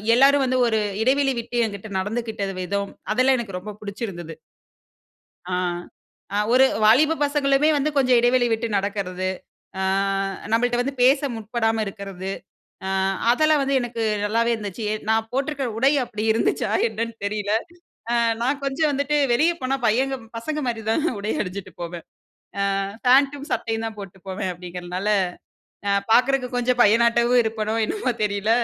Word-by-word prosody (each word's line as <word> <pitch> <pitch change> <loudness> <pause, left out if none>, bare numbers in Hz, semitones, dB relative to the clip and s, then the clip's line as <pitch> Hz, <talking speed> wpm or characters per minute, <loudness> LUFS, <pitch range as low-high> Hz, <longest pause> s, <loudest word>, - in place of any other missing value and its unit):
எல்லாரும் 275 +2 +5
வந்து 255 0 +1
ஒரு 220 -1 +1 0.2
இடைவெளி 270 +2 +2
விட்டு, 240 +1 -6
என்கிட்ட 200 +1 -8
நடந்துக்கிட்ட 220 +1 -3 0.2
விதம். 200 +2 -2 0.2
அதெல்லாம் 255 +3 +3
எனக்கு 200 -6 -5
ரொம்ப 210 +3 -8
பிடிச்சிருந்தது. 195 -6 -6 1.1
ஆ 185 - -5 0.8
அ - - +2
ஒரு 260 +1 +6 0.2
வாலிப 280 +9 +5
பசங்களுமே 285 0 +2
வந்து, 290 +2 +1
கொஞ்ச 255 -2 +2
இடைவெளி 245 +1 +3
விட்டு 225 +1 0
நடக்குறது. 195 -2 -2 0.5
ஆ - - 0 0.7
நம்மள்ட்ட 240 +2 +2
வந்து 275 +2 -2
பேச 270 +3 +6 0.2
முற்படாம 225 0 -1
இருக்குறது. 195 -1 -6 0.6
அ - - -2 0.4
அதெல்லாம் 310 +4 +3
வந்து 275 0 +1
எனக்கு 235 -1 -4 0.2
நல்லாவே 230 +3 +1
இருந்துச்சு. 210 0 -5 0.2
நான் 220 0 +2
போட்டுருக்கிற 275 +1 -1
உடை 265 +4 +4
அப்படி 215 -3 -6
இருந்துச்சா, 225 - 0 0.2
என்னன்னு 230 - -4
தெரியல. 205 0 -2 0.6
அ - - +1 0.3
நான் 270 +4 0
கொஞ்ச 275 +2 -3
வந்துட்டு 285 +1 0 0.2
வெளிய 310 +8 +4
போனா, 260 +1 0
பையங்க 265 +5 +1 0.2
பசங்க 300 +6 -3
மாரி 225 -2 -2
தான், 295 +7 +1 0.2
உடை 210 +2 -2
அணிஞ்சுட்டு 190 0 -6
போவேன் 170 -1 -6 0.7
ஆ, - - 0 0.3
பேண்ட்டும், 275 +2 +4
சட்டையும் 225 -1 -2
தான் 220 - -6
போட்டு 195 -1 -10
போவேன் 190 0 -3
அப்படிங்கிறனால, 180 +2 -5 0.8
அ, - - +2 0.2
பாக்குறக்கு 255 +1 +3
கொஞ்ச 245 0 0
பையனாட்டவும் 235 +3 +4
இருப்பனோ, 220 0 -2
என்னவோ 365 - -1
தெரியல. 205 +1 -1
230 Hz, 140 wpm, -23 LUFS, 205-265 Hz, 1.1 s, ஒரு